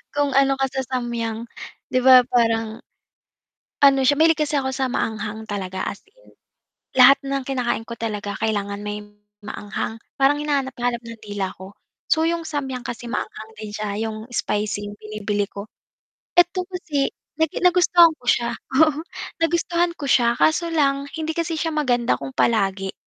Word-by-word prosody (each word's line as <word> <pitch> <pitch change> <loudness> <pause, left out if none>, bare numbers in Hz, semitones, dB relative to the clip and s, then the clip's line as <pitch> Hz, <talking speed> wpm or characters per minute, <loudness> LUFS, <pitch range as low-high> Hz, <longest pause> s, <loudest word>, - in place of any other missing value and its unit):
kung 285 -1 +1
ano 275 0 +4
ka 270 - +1
sa 265 - -1
Samyang, 230 -2 -3 0.5
'di 255 - +3
ba, 255 0 +8
parang 225 -2 +1 1.0
ano 270 -1 +6
siya, 285 - +5
mahilig 320 +1 +4
kasi 300 0 0
ako 265 -1 0
sa 265 0 -1
maanghang 220 -2 -3
talaga, 190 -3 -4
as 200 - -4
in, - - -23 0.6
lahat 260 +2 +8
ng 275 -1 -1
kinakain 250 -4 -1
ko 235 - -6
talaga 210 -3 -4
kailangan 205 -2 -1
may 210 0 -4 0.4
maanghang, 210 +2 -5 0.2
parang 280 +2 +3
hinahanap-hanap 265 -5 -1
ng 230 0 -9
dila 205 -2 -3
ko, 190 +2 -11 0.3
So, 320 0 +3
yung 335 -1 -1
Samyang 265 -5 -4
kasi 240 0 -6
maanghang 220 -2 -5
din 215 0 -8
siya, 210 0 -4
'yong 220 +2 -5
spicy 205 -2 -1
binibili 210 -1 -2
ko. 200 +1 -9 0.7
Eto 350 +1 +4
kasi 315 -7 -1 0.3
nag 320 -1 +3
nagustuhan 350 -2 +6
ko - - -23
siya 235 -1 +2 0.3
oo, 310 -1 +4 0.4
nagustuhan 340 +1 +1
ko 285 - -4
siya, 235 -3 +4
kaso 335 +2 +2
lang 280 -3 +2
hindi 320 0 -2
kasi 335 0 -1
siya 330 - 0
maganda 250 -5 +1
kung 270 - -6
palagi. 195 -4 +1
250 Hz, 155 wpm, -22 LUFS, 215-290 Hz, 1.0 s, ba